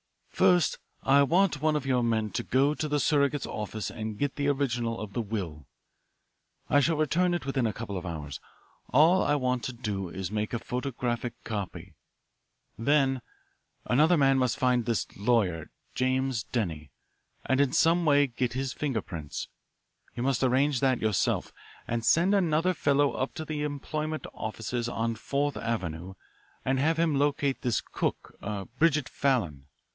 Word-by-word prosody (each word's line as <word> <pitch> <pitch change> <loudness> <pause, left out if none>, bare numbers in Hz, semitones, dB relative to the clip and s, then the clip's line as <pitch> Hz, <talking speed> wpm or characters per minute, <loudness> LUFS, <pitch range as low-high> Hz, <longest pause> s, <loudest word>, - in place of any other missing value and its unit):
"First, 175 -5 +3 0.2
I 140 +1 +5
want 165 +1 +3
one 155 0 +2
of 145 -2 -1
your 130 -2 +2
men 110 -3 0
to - - -1
go 140 +4 +2
to 155 - -3
the 150 0 0
surrogate's 140 0 +2
office 105 0 -4
and 110 -1 -5
get 145 +3 -1
the 140 -1 -1
original 120 -5 0
of 105 -2 -7
the 120 - -1
will. 95 - -5 1.0
I 145 - +4
shall 155 +3 +2
return 175 +4 +2
it 175 - -4
within 135 -3 0
a 110 - -2
couple 105 -3 -6
of 90 0 -4
hours 75 -4 -5 0.5
all 160 +7 +5
I 145 - +2
want 125 -3 0
to 130 - -3
do 105 -6 -4
is 95 0 -5
to - - -10
make 105 0 -1
a 120 - -1
photographic 125 -1 -3
copy. 95 -5 -5 0.8
Then 135 +1 +2 0.6
another 155 +7 +4
man 135 -2 +4
must 125 -2 +1
find 125 -2 +2
this 115 -3 +1
lawyer, 100 -7 +1 0.2
James 130 -2 0
Denny, 80 - -3 0.6
and 130 +1 +2
in 140 -2 +2
some 170 +2 +3
way 145 -2 +5
get 125 -1 -2
his 130 0 -2
finger 135 -8 -2
prints 80 -5 -6 0.7
you 120 - -3
must 135 -2 +1
arrange 135 +1 +2
that 130 -2 +2
yourself. 110 -4 0 0.3
And 115 0 -2
send 175 - +4
another 175 -2 +2
fellow 145 -3 +2
up 130 - -3
to 160 - -5
the 150 -1 -3
employment 155 +2 -3
offices 115 +2 -3
on 115 -1 -1
Fourth 140 +5 -2
Avenue 95 -5 -3 0.5
and 130 0 +1
have 160 +4 +2
him 165 -2 +2
locate 140 -1 +1
this 120 -3 +1
cook, - - -4 0.4
Bridget 150 -4 +3
Fallon. 90 - -1
130 Hz, 165 wpm, -28 LUFS, 110-145 Hz, 1.0 s, I